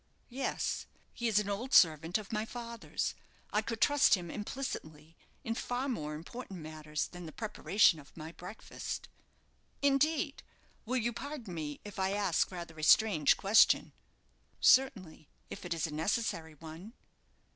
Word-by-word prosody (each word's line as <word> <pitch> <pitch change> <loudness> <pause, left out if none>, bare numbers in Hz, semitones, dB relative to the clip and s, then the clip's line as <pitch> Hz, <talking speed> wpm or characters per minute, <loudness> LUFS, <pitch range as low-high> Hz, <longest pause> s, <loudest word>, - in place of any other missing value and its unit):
"Yes; 260 +2 -2 0.3
he 235 - -2
is 220 -3 +2
an 210 -1 +2
old 215 +6 -1
servant 165 +1 +5
of 215 -2 -9
my 215 -1 0
father's. 235 0 -4 0.4
I 210 - +3
could 225 0 -4
trust 290 +1 +5
him 175 -3 -6
implicitly 165 - -6 0.3
in 225 - -1
far 245 +3 -2
more 150 - -3
important 190 +4 -8
matters 155 -1 -4
than 175 -1 -9
the - - -8
preparation 205 -5 +2
of 140 +2 -16
my 160 0 -7
breakfast." 180 +6 -7 0.7
"Indeed! 285 +1 +2 0.5
Will 255 +2 +1
you 235 0 0
pardon 270 -8 -6
me 150 -3 -5
if 205 -2 -8
I 190 +1 +1
ask 200 -5 +1
rather 170 -3 -8
a - - -6
strange 160 -4 +5
question?" 205 +3 +5 0.7
"Certainly, 190 - +3 0.2
if - - -7
it 175 - -7
is 160 - -1
a 155 - -5
necessary 160 -1 -1
one." 165 +8 -10
195 Hz, 150 wpm, -32 LUFS, 160-235 Hz, 0.7 s, servant